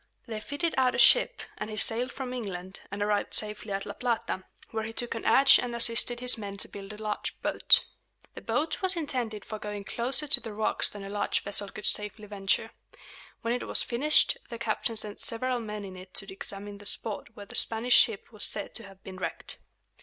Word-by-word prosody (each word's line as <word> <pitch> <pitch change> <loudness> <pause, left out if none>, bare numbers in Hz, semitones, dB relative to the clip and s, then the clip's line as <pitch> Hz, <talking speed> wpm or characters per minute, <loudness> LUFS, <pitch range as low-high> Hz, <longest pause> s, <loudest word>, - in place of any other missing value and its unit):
They 225 -3 -5
fitted 290 +9 -2
out 255 -1 +3
a - - -2
ship, - - +5 0.2
and - - -4
he 215 - -6
sailed 235 +4 +1
from 255 -2 -6
England, 190 -6 -6
and 200 +1 -3
arrived 205 0 0
safely 210 0 0
at 195 0 -2
La - - -6
Plata, 235 -6 -2 0.3
where 220 -1 -2
he 225 +1 -6
took 240 +1 -2
an 225 - -6
adze 275 0 +7
and 245 -1 -4
assisted 235 +1 +3
his 250 -2 +2
men 200 -1 -6
to - - -1
build 200 0 -9
a 210 - -9
large 215 -1 -4
boat. - - +5 0.5
The - - -9
boat 315 +2 -1
was 375 -1 +2
intended 245 -9 -3
for 215 - -6
going 210 -1 -6
closer 250 +8 -1
to 280 - +7
the 225 -2 -8
rocks 215 0 +1
than 205 -1 -9
a 195 - -7
large 205 0 0
vessel 200 0 -4
could 215 - -8
safely 210 +1 +1
venture. 205 +2 -1 0.7
When 230 +1 0
it 245 - -3
was - - +3
finished, 300 - +3
the 235 - -6
captain 230 0 -1
sent 210 -1 -3
several 250 +2 0
men 210 -2 -6
in 190 -1 -9
it 185 0 -12
to 195 0 -5
examine 200 +1 -6
the 205 - -3
spot 210 0 -1
where 205 -3 -9
the - - -13
Spanish 230 +2 +5
ship 220 -1 +4
was 210 - -3
said 205 - -1
to 230 - -2
have 195 -1 -16
been 190 -1 -9
wrecked. 185 - -4
215 Hz, 215 wpm, -28 LUFS, 205-240 Hz, 0.7 s, adze